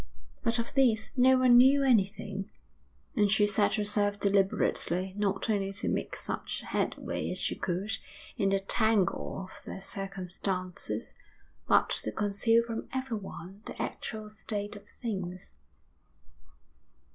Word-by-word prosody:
But 230 0 +1
of 235 +3 -3
this 235 -6 +3
no 260 0 +6
one 255 -1 +6
knew 275 +2 +6
anything; 200 -4 +1 0.7
and 205 -4 +3
she 210 0 +5
set 205 0 +2
herself 205 -1 +1
deliberately 190 -2 +1
not 200 0 0
only 200 -3 0
to 200 - -2
make - - -2
such - - -4
headway - - -2
as - - -1
she - - 0
could 190 +4 -2 0.4
in 195 - +1
the 195 0 +2
tangle 195 -2 +1
of - - -13
their 195 - -7
circumstances, 190 -1 -3 0.5
but - - +4
to - - -3
conceal 215 +3 +2
from 230 -1 -5
everyone 205 -7 -5
the - - -8
actual 215 -2 -4
state 210 -1 -4
of 205 0 -12
things. 185 - -5
205 Hz, 130 wpm, -30 LUFS, 195-225 Hz, 0.7 s, no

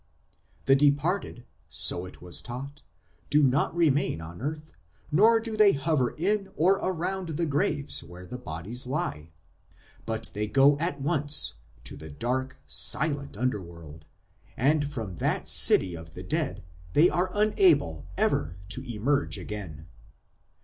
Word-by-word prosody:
The 135 - +6
departed, 145 -1 +1 0.2
so 90 +1 -1
it 90 - -14
was 90 -1 -4
taught, 135 +4 -8 0.5
do 150 0 +4
not 135 +5 +2
remain 145 - +2
on 85 +4 -9
earth, 155 +2 -5 0.4
nor 220 +8 +5
do 225 -1 -5
they 210 -2 +6
hover 140 -3 0
in 195 +4 0
or 185 +5 +3
around 185 0 -3
the 170 - +1
graves 145 -1 0
where 90 +2 -11
their 125 +7 -8
bodies 105 +7 -4
lie; 80 - -3 0.8
but 115 0 -4
they 105 +1 -2
go 140 +5 +5
at 160 -3 -2
once 145 0 +2 0.3
to 65 - -7
the 80 - -10
dark, 130 - -3
silent 140 - +1
underworld, 85 -10 -5 0.5
and 145 +3 +2
from 110 - -6
that - - -1
city 90 -2 +4
of 80 -1 -10
the 90 - -7
dead 90 - -2 0.3
they 165 - +6
are 180 +1 0
unable 175 - +2
ever 80 +4 0
to 125 - -2
emerge 140 +6 0
again. 90 -7 -7
135 Hz, 140 wpm, -27 LUFS, -, 0.8 s, The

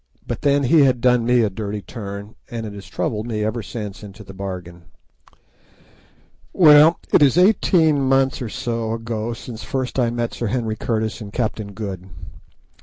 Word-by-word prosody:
But - - -4
then 140 0 +2
he 155 +5 +4
had 130 -3 +4
done 125 -1 +3
me 125 -1 +4
a 105 - +1
dirty 105 0 -5
turn, 100 -2 -8 0.2
and 115 -1 -5
it 105 - -7
has 100 -1 -10
troubled 105 +2 -3
me 110 -3 -2
ever 110 +2 -2
since 105 -1 -7
into 105 +1 -11
the 95 - -12
bargain. 90 -3 -7 1.7
Well, 155 -1 +7 0.2
it - - +6
is 145 +2 +5
eighteen 175 -6 +4
months 135 0 +2
or 120 - -4
so 115 0 -3
ago 115 0 -3
since 115 -1 -9
first 130 -2 -3
I 120 -2 +2
met 120 0 -3
Sir 120 - -3
Henry 115 -1 -1
Curtis 110 -2 -2
and 100 -1 -8
Captain 110 -3 -3
Good. 95 -3 -6
115 Hz, 175 wpm, -21 LUFS, 105-130 Hz, 1.7 s, Well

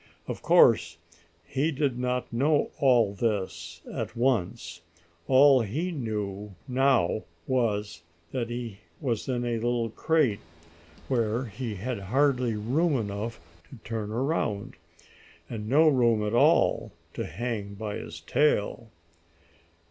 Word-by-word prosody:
Of - - -5
course 85 -1 +5 0.5
he 145 +5 0
did 140 -4 -1
not 125 0 -2
know 145 +5 +2
all 120 -7 +4
this 90 -6 -3
at - - -4
once. 110 -8 -1 0.5
All 135 0 +6
he 150 - -2
knew 105 - -4
now 130 -6 +2 0.2
was 105 -9 -1 0.3
that 120 -3 -2
he 120 -4 -5 0.2
was 125 -5 -2
in 120 -1 -1
a 120 - -1
little 120 -1 -1
crate, 150 -7 +1 0.7
where 120 -1 0
he 115 0 -5
had 115 +3 -4
hardly 125 +2 +1
room 135 +9 +1
enough 110 +1 -4 0.3
to - - -11
turn 110 -2 -4
around, 115 -5 -1 0.7
and 110 -2 -6
no 155 +5 +5
room 120 -7 +3
at 105 - -2
all 120 - +3 0.2
to - - -3
hang 105 +2 -4
by 105 0 -4
his 80 0 -8
tail. 115 - +1
115 Hz, 125 wpm, -27 LUFS, 105-130 Hz, 0.7 s, All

